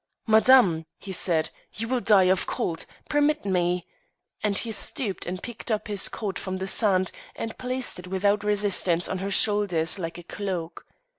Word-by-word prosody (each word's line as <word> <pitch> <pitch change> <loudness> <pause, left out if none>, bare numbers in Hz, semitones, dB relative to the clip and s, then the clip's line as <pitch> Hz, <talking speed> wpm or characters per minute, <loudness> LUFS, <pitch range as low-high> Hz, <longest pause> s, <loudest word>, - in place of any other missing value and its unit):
"Madame," 220 -8 +5
he 195 - -9
said, 170 -3 +1 0.2
"you 225 +2 -3
will 255 +1 0
die 210 -5 +5
of 185 0 +2
cold: 165 -1 -3 0.2
permit 295 -1 +1
me," 180 -2 0 0.6
and 205 -2 +1
he 230 - 0
stooped 215 -1 0
and 180 +1 -5
picked 240 0 -7
up 215 -2 -1
his 205 -2 +2
coat 200 -4 -4
from 185 0 -4
the 190 - -4
sand 190 -2 +2 0.2
and 225 - -5
placed 255 -4 -2
it 180 - -10
without 200 +2 +1
resistance 200 -4 +2
on 190 - -3
her 195 +1 -3
shoulders, 200 -5 +2
like 165 -1 -5
a 175 - -10
cloak. 180 -3 -5
195 Hz, 170 wpm, -25 LUFS, 180-220 Hz, 0.6 s, Madame